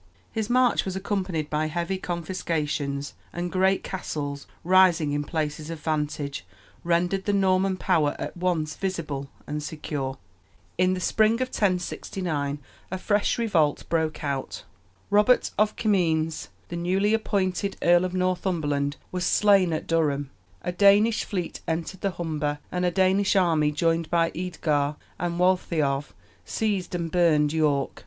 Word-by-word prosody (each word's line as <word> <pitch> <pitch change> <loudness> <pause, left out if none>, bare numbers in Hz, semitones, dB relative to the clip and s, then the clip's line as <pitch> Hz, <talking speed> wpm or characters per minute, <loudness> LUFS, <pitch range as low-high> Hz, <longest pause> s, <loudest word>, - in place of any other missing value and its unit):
His 220 -1 -2
march 250 0 +3
was 190 -1 -4
accompanied 190 -5 -2
by 155 +1 0
heavy 175 +4 -2
confiscations, 155 -5 -2 0.2
and 175 0 -4
great 190 +1 +2
castles, 145 -6 -4 0.2
rising 175 -4 +4
in 145 0 -1
places 155 0 -3
of 165 -1 -5
vantage, 150 -2 -2 0.4
rendered 175 +3 +1
the 205 - +1
Norman 190 -1 +2
power 160 -6 +1
at - - -5
once 170 -4 -1
visible 155 -8 -3 0.2
and 150 +1 -4
secure. 145 -3 -4 0.6
In 185 +1 +2
the - - -4
spring 215 +4 +3
of 255 +2 -2
1069 175 - -1 0.3
a 190 - -3
fresh 205 +2 +1
revolt 170 -11 +1
broke 160 -2 -1
out. 140 -2 -3 0.5
Robert 210 +5 +4
of 215 0 +3
Comines, 165 -7 +1 0.2
the 170 - -5
newly 190 +5 +1
appointed 200 -3 0
Earl 175 +1 +5
of 185 0 -2
Northumberland, 170 -6 0 0.2
was 180 -1 -2
slain 195 -1 +4
at 155 - -2
Durham; 145 -4 0 0.3
a - - -1
Danish 205 +4 +4
fleet 180 -4 -4
entered 170 +3 -3
the 200 - +1
Humber, 150 -3 -2
and 180 0 0
a - - +3
Danish 190 +2 +2
army, 160 -5 +3
joined 165 +1 0
by 165 -1 +2
Eadgar 155 -5 -1 0.2
and 170 0 -2
Waltheof, 155 -6 +1 0.3
seized 200 -5 -2
and 170 -2 -3
burned 155 -4 +3
York. 150 -3 +1
175 Hz, 140 wpm, -26 LUFS, 150-190 Hz, 0.6 s, Earl